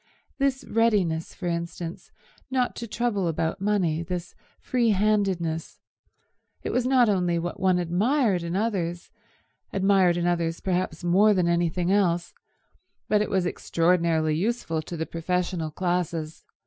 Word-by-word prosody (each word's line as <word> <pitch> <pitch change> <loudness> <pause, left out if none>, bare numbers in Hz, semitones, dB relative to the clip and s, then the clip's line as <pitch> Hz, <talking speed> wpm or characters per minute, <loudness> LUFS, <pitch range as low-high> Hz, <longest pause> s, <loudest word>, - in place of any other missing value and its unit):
This 275 -1 0
readiness, 200 -8 +1
for 185 - -7
instance, 170 0 -4 0.4
not 255 -2 0
to 235 - -5
trouble 210 -5 -1
about 165 +3 -2
money, 190 -6 +1
this 175 0 -5 0.3
free 240 -3 +1
handedness—it 190 -6 0 0.9
was 250 0 +1
not 255 -2 +5
only 180 -4 +1
what 170 +1 -4
one 185 -1 +3
admired 195 - +1
in 170 +1 -3
others, 185 -5 -2 0.6
admired 190 -3 +3
in 175 - -1
others 170 -1 0
perhaps 180 -3 -2
more 200 +5 +4
than 180 -2 +2
anything 170 +1 +1
else, 175 -4 +1 0.8
but 210 -1 +3
it 210 - -1
was 190 -2 +1
extraordinarily 165 -3 +1
useful 175 -3 -1
to 170 +2 -7
the 160 - -2
professional 175 0 -2
classes. 170 -2 -2
180 Hz, 135 wpm, -26 LUFS, 170-205 Hz, 0.9 s, not